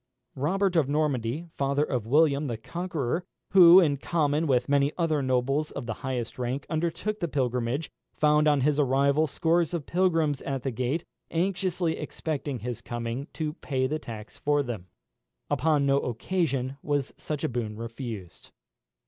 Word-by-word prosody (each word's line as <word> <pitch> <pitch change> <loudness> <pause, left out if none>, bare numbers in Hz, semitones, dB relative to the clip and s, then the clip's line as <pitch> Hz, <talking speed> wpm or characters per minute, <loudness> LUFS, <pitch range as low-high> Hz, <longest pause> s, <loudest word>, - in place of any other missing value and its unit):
Robert 185 +7 0
of 150 -5 +3
Normandy, 145 -1 0
father 140 +1 +1
of 125 -7 -2
William 145 +1 +3
the 120 -3 -3
Conqueror, 165 +2 -3 0.3
who, 180 -1 +9
in 150 -6 +3
common 155 +1 0
with 125 -3 +2
many 140 0 +3
other 160 -4 +1
nobles 135 +3 +1
of - - -6
the 115 - -2
highest 125 -2 -3
rank, 125 +3 -2
undertook 170 +6 -1
the 170 - -1
pilgrimage, 125 0 -1 0.2
found 150 0 +3
on 145 -2 +4
his 150 +2 +2
arrival 140 +3 +3
scores 165 +3 +1
of 155 -5 -4
pilgrims 165 -6 +1
at 135 -2 -3
the 135 - -1
gate, 130 +8 -2 0.2
anxiously 180 -1 0
expecting 145 -4 -3
his 120 -1 -4
coming 120 +3 -4
to 155 -2 -3
pay 135 -5 -2
the 155 +4 -1
tax 110 -6 -9
for 145 0 +2
them. 110 -8 -6 0.6
Upon 150 -3 +2
no 140 0 +3
occasion 135 0 -1
was 145 -2 -1
such 150 -2 -5
a - - +2
boon 115 -4 -3
refused. 115 -5 -7
145 Hz, 155 wpm, -27 LUFS, 125-160 Hz, 0.6 s, who